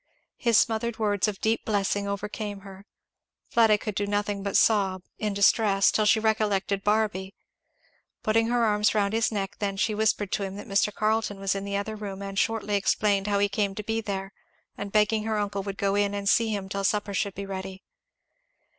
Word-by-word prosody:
His 235 -3 +3
smothered 230 0 +1
words 205 -2 +1
of 205 -2 -4
deep 225 +1 +1
blessing 205 -1 0
overcame 205 0 -4
her. 195 +1 -12 0.6
Fleda 225 -2 +5
could 215 +1 -5
do 200 +1 -2
nothing 205 0 -1
but 200 0 0
sob, 195 -4 +2 0.2
in 210 -1 -1
distress, 200 -1 +4
till 215 - +1
she 220 +1 +4
recollected 205 -3 0
Barby. 205 -3 0 0.9
Putting 225 +1 +2
her 240 0 +1
arms 210 0 +2
round 200 -1 +1
his 225 0 +1
neck 195 -2 -3
then 200 -1 -2
she 215 +2 +1
whispered 210 -2 0
to - - -1
him 195 -1 -4
that 205 - -8
Mr. 200 +1 +1
Carleton 215 -1 -1
was 195 -1 0
in 195 0 -4
the 200 0 -2
other 215 +2 -4
room 200 -2 -6
and 195 0 -3
shortly 225 -2 -1
explained 200 0 +1
how 205 -1 +1
he 200 0 +3
came 200 -1 -1
to 210 - -5
be 225 +2 -1
there, 195 -2 -5 0.4
and 200 -1 -6
begged 215 +1 +2
her 220 0 -1
uncle 200 -1 -2
would 195 0 -6
go 195 0 0
in 205 0 +1
and 200 0 -4
see 230 +2 +4
him 200 -3 -3
till 195 +1 -3
supper 205 0 0
should 195 0 -1
be 200 - -5
ready. 190 0 -6
205 Hz, 200 wpm, -26 LUFS, 195-215 Hz, 0.9 s, Fleda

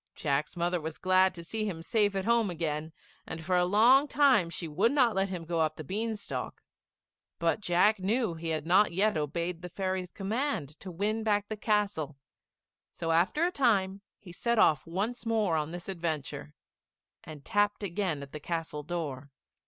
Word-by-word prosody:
Jack's 145 +3 -1
mother 175 0 0
was 160 0 -5
glad 185 0 +4
to 170 - -8
see 215 +6 -3
him 170 -6 -4
safe 205 +1 +1
at 190 -1 -1
home 235 -3 +3
again, 160 -2 -3 0.4
and 160 0 -7
for 180 +1 +1
a 180 0 +4
long 240 +9 +5
time 265 -10 +4
she 170 0 -4
would 190 +10 +2
not 255 -6 +3
let 195 0 +1
him 180 -3 -5
go 165 0 -2
up 155 -1 +1
the 155 - -7
bean 220 +8 -2
stalk; 200 - -6 0.7
but 170 +5 0
Jack 195 +3 +3
knew 215 +1 0
he 165 0 -7
had 155 -1 -2
not 185 +4 +4
yet 200 +4 +2
obeyed 170 +3 -2
the 180 - -7
fairy's 185 0 -3
command 215 - -2
to 190 - -8
win 205 +5 -1
back 205 -2 0
the 215 - -3
castle, 205 -9 -1 0.7
so 165 -1 -3
after 185 - +2
a 355 - 0
time 200 - +1 0.2
he 180 - -13
set 235 +6 -1
off 155 -7 +4
once 205 +8 -2
more 220 -7 +1
on 155 -1 -1
this 175 +1 -7
adventure, 160 - -4 0.7
and 150 -3 -11
tapped 205 -1 +1
again 175 -6 -2
at 140 - -11
the 150 - -6
castle 160 -1 -4
door. 150 -4 -5
185 Hz, 185 wpm, -29 LUFS, 165-210 Hz, 0.7 s, long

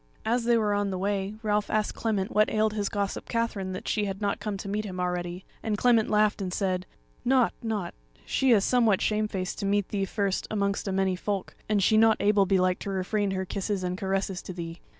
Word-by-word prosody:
As 235 +1 +1
they 235 0 +4
were 210 -2 +1
on 205 0 0
the 190 - -2
way 200 +1 -1
Ralph 210 -1 +1
asked 215 -1 0
Clement 210 -4 -1
what 215 0 +3
ailed 215 0 +1
his 205 -2 -1
gossip 200 -1 -3
Katherine 230 -5 -1
that 185 - -6
she 210 -1 +1
had 195 -1 -4
not 205 -1 -1
come 210 -2 -3
to 200 - -7
meet 210 +2 -1
him 185 -3 -6
already; 180 0 -3 0.2
and 215 -2 -1
Clement 230 -1 +3
laughed 210 0 +2
and 185 -2 -3
said: 185 -1 -1 0.4
"Nought, 250 -1 +3
nought; 210 -6 -3 0.3
she 265 - +1
is 215 -5 +5
somewhat 230 -6 +3
shamefaced 210 -4 -1
to - - -2
meet 205 -1 +1
thee 195 -2 -1
first 200 -1 -1
amongst 200 -1 -1
a - - 0
many 190 -1 +1
folk, 195 +1 -3 0.2
and 205 -2 +2
she 215 - +4
not 225 0 +5
able 200 -1 +3
belike 185 -1 +2
to - - -5
refrain 195 +2 0
her 190 -1 -2
kisses 195 0 -2
and 180 0 -1
caresses 190 -1 -2
to 185 - -7
thee. 170 -1 -6
200 Hz, 220 wpm, -27 LUFS, 190-215 Hz, 0.4 s, is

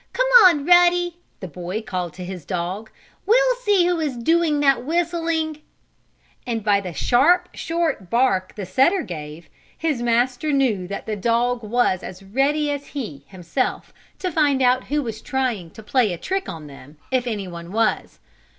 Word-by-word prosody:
"Come - - +1 0.2
on, 310 -6 +4
Ruddy!" 350 0 +4 0.2
the 185 - -5
boy 180 +6 -5
called 180 -5 -4
to 180 - -7
his 180 -3 -7
dog. 185 +6 -4 0.4
"We'll - - +4
see 410 -7 +2
who 350 -1 +1
is 290 -6 -2
doing 320 +4 +2
that 275 -4 +3
whistling!" 330 -1 -1 0.9
And 225 -3 -2
by 200 -1 +3
the 185 -2 -6
sharp, 315 - +3
short 330 - -2
bark 235 -6 +1
the 205 - -5
setter 270 - +2
gave 155 -1 -8 0.3
his 305 -7 -1
master 245 +5 +1
knew 240 -10 +1
that 200 +1 -6
the 220 - -3
dog 235 +4 0
was 215 -4 +1
as 185 +1 -9
ready 280 +8 0
as 285 0 -5
he, 150 - -6
himself, 185 +6 -3 0.2
to 365 - -3
find 290 -4 +2
out 255 +1 +3
who 295 0 -1
was 220 -3 -6
trying 245 -10 -2
to 220 - -13
play 230 -1 +1
a 175 - -4
trick 380 - -3
on 160 -2 -7
them, 145 +1 -13
if 255 -1 0
anyone 180 -6 -5
was. 220 +1 0
245 Hz, 170 wpm, -22 LUFS, 190-310 Hz, 0.9 s, on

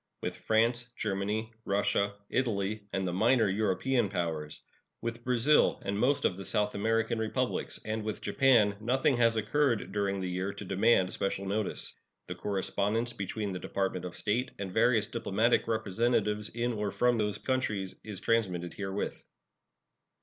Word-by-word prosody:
With - - -2
France, 120 +2 +1
Germany, 105 +2 -2
Russia, 100 0 +1 0.2
Italy, 105 -4 -1
and 95 -1 -1
the 90 - -2
minor 115 +5 +4
European 105 +4 +1
powers; 80 -5 -3 0.4
with 115 0 -5
Brazil 125 +4 +3
and 100 +1 -1
most 125 +7 +2
of 90 - +1
the 95 - -6
South 105 +1 0
American 115 +2 0
Republics, 110 -1 -1
and 110 0 -2
with 110 -1 -3
Japan, 115 -7 +4
nothing 130 +4 +2
has 115 -1 +4
occurred 120 +1 +1
during 100 -1 0
the 95 - -2
year 90 +2 -2
to 100 0 -8
demand 95 0 +3
special 100 0 -2
notice. 105 +1 -2 0.3
The - - -5
correspondence 105 +4 -1
between 100 +1 -3
the 90 - -4
Department 95 -1 -2
of 90 - -6
State 115 +4 0
and 100 -2 -5
various 115 -1 +4
diplomatic 115 0 +1
representatives 110 0 0
in 120 +1 -1
or 105 -2 -1
from 120 +2 +2
those 105 -1 0
countries 110 -8 -1
is 105 -4 -6
transmitted 95 -7 0
herewith. 95 0 -4
105 Hz, 150 wpm, -30 LUFS, 100-115 Hz, 0.4 s, minor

